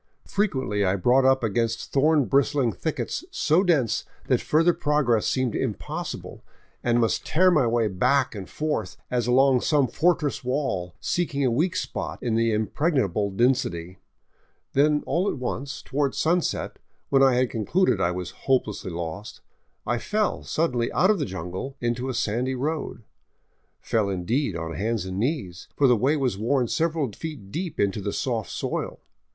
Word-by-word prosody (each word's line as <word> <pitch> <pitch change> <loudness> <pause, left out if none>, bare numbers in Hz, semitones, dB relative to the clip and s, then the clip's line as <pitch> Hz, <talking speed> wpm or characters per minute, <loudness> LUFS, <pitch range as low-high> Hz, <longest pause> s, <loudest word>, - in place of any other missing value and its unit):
Frequently 130 - 0
I 95 0 +2
brought 125 +7 +3
up 130 -1 +4
against 115 +1 -1
thorn 150 0 +4
bristling 140 -2 +2
thickets 160 - -3
so 175 - +2
dense 150 - +2 0.2
that - - +2
further 165 +3 +3
progress 145 -9 +1
seemed 130 -4 0
impossible, - - -4 0.4
and 120 0 +2
must 115 -1 +1
tear 185 +3 +4
my 150 -8 +3
way 115 -1 +2
back 125 +8 +1
and 100 -4 -7
forth, 150 -11 -3
as 120 -2 0
along 130 0 +4
some 145 -4 +2
fortress 150 +3 +1
wall, 110 -10 -2
seeking 145 -6 -1
a 125 - +2
weak 160 +10 +1
spot - - -3
in 120 -3 0
the 115 0 +2
impregnable 110 - 0
density. 100 -6 0 0.7
Then 150 +2 +3
all 185 +4 +1
at - - -3
once, 135 +2 -4
toward 140 -1 -1
sunset, 170 +2 0 0.3
when 135 -1 +4
I 135 -2 +5
had 125 0 +1
concluded 120 - +1
I 85 - +2
was 90 -1 -4
hope 135 -2 +1
lessly 105 -3 -6
lost, 85 +5 -6 0.4
I 120 +1 0
fell 215 - -1
suddenly 125 -8 -1
out 185 +3 +4
of 210 - 0
the - - 0
jungle 95 +8 -6
into 120 +2 -2
a 130 - -3
sandy 120 +3 -1
road, 145 -3 -3 0.8
fell 110 -3 0
in 90 -2 -3
deed 135 +8 0
on 80 0 -4
hands 110 +1 -1
and 95 +1 -4
knees, 110 - -2
for 145 - +3
the 125 - +5
way 135 +8 +2
was 125 -8 -1
worn 125 +2 +1
several 160 -3 0
feet 130 -5 -8
deep 170 +1 -4
into 100 0 +1
the 100 - -2
soft 115 -5 -2
soil. - - -3
125 Hz, 165 wpm, -25 LUFS, 110-150 Hz, 0.8 s, I